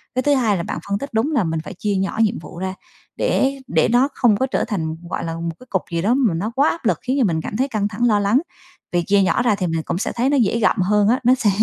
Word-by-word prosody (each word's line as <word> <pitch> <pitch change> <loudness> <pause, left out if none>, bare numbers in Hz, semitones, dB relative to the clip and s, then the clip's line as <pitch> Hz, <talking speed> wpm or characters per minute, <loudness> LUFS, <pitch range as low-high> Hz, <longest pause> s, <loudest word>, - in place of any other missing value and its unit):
Cái 255 - +2
thứ 290 +2 +2
hai 220 -6 +2
là 170 - -3
bạn - - -4
phân 200 - +1
tích 280 - -7
đúng 225 +8 +1
là 270 -9 +2
mình 160 -2 -2
phải 160 - -8
chia 205 +2 -2
nhỏ 195 +2 -2
nhiệm 215 - +1
vụ 170 - -11
ra, 190 0 -3 0.4
để 275 +1 0
để 160 -1 +2
nó 245 +3 +4
không 225 -5 +3
có 260 - +1
trở 265 - -1
thành 160 -8 -2
gọi - - -3
là 165 0 -4
một 165 0 -3
cái 255 - -15
cục 190 - 0
gì 170 0 -1
đó 210 +7 +2
mà 250 -9 +2
nó 200 +7 -2
quá 280 +3 +4
áp 330 - -5
lực, - - +2
khiến 260 +2 -1
cho 255 - +4
mình 165 -5 0
cảm 205 - -5
thấy 265 +3 +1
căng 215 -6 -1
thẳng, 210 +4 -2
lo 210 -3 +3
lắng. 205 +7 +2 0.5
Vì 175 - +1
chia 200 +3 +3
nhỏ 190 +6 +2
ra 235 -4 +2
thì 185 -3 -2
mình 165 -1 -2
cũng - - -3
sẽ 220 - -2
thấy 245 +3 +1
nó 285 - +2
dễ 230 0 +2
gặm 220 - +2
hơn 205 +2 +3
á, 250 - +3
nó 250 +2 +5
sẽ 220 -5 +1
210 Hz, 310 wpm, -20 LUFS, 185-250 Hz, 0.5 s, nó